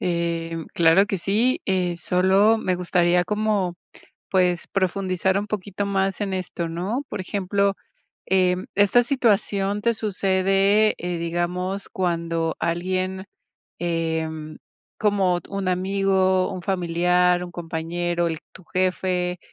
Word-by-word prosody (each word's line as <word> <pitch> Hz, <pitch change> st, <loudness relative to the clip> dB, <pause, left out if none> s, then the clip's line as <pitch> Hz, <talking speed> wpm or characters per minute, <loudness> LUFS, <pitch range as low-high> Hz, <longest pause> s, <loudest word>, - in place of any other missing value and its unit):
Em, 165 Hz, -2 st, -2 dB
claro 170 Hz, +4 st, +5 dB
que 195 Hz, -2 st, -2 dB
sí, 215 Hz, +9 st, +1 dB
eh, 180 Hz, -3 st, 0 dB
solo 190 Hz, +6 st, +3 dB
me 185 Hz, -4 st, 0 dB
gustaría 175 Hz, 0 st, +2 dB
como, 210 Hz, -4 st, 0 dB, 0.6 s
pues, 180 Hz, -2 st, +2 dB
profundizar 190 Hz, 0 st, 0 dB
un 205 Hz, -, -3 dB
poquito 200 Hz, -1 st, -3 dB
más 195 Hz, 0 st, 0 dB
en 200 Hz, -2 st, -2 dB
esto, 175 Hz, -2 st, -4 dB
¿no?, 190 Hz, +11 st, -2 dB
por 195 Hz, -, -5 dB
ejemplo, 200 Hz, +1 st, 0 dB, 0.5 s
em, 185 Hz, -1 st, +2 dB
esta 205 Hz, +4 st, +5 dB
situación 205 Hz, -5 st, +1 dB
te 235 Hz, +1 st, +2 dB
sucede, 195 Hz, 0 st, +2 dB
eh, 175 Hz, 0 st, -3 dB
digamos, 180 Hz, +3 st, -2 dB
cuando 165 Hz, -2 st, -1 dB
alguien, 185 Hz, +2 st, -2 dB, 0.5 s
em, 160 Hz, -2 st, -2 dB, 0.4 s
como 195 Hz, -4 st, +2 dB
t -, -, -19 dB
un 195 Hz, -2 st, -2 dB
amigo, 190 Hz, 0 st, +1 dB
un 185 Hz, -1 st, -6 dB
familiar, 180 Hz, 0 st, +2 dB
un 175 Hz, -, -9 dB
compañero, 175 Hz, +1 st, -2 dB
el 160 Hz, -1 st, -3 dB
tu 185 Hz, -, -15 dB
jefe. 180 Hz, 0 st, -1 dB
185 Hz, 125 wpm, -23 LUFS, 175-195 Hz, 0.6 s, claro